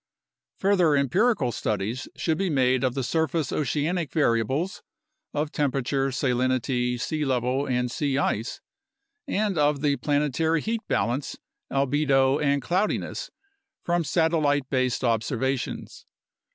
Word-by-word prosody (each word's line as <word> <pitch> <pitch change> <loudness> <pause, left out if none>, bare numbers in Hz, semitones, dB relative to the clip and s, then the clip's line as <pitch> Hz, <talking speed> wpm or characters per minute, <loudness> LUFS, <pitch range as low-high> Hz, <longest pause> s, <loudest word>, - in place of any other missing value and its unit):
Further 185 -6 +3
empirical 140 - +2
studies 110 +4 -2
should 160 -2 -1
be 195 -1 +1
made 130 -3 +2
of 130 -2 0
the 135 - -1
surface 160 0 0
oceanic 155 +3 -1
variables 140 - 0 0.5
of 150 0 -2
temperature, 135 -1 0
salinity, 125 -1 0
sea 155 +5 -2
level, 130 0 0
and 125 -1 0
sea 140 0 -1
ice 115 -4 -1 0.7
and 205 - 0
of 145 -1 +2
the 145 -2 +2
planetary 150 +2 +1
heat 225 0 -2
balance, 120 +7 -1 0.3
albedo, 135 0 +2
and 140 -2 +1
cloudiness 185 +9 -1 0.5
from 175 0 +1
satellite 155 -4 +1
based 130 -2 0
ob 115 -3 +2
servations. 130 +1 -3
140 Hz, 120 wpm, -25 LUFS, 130-160 Hz, 0.7 s, Further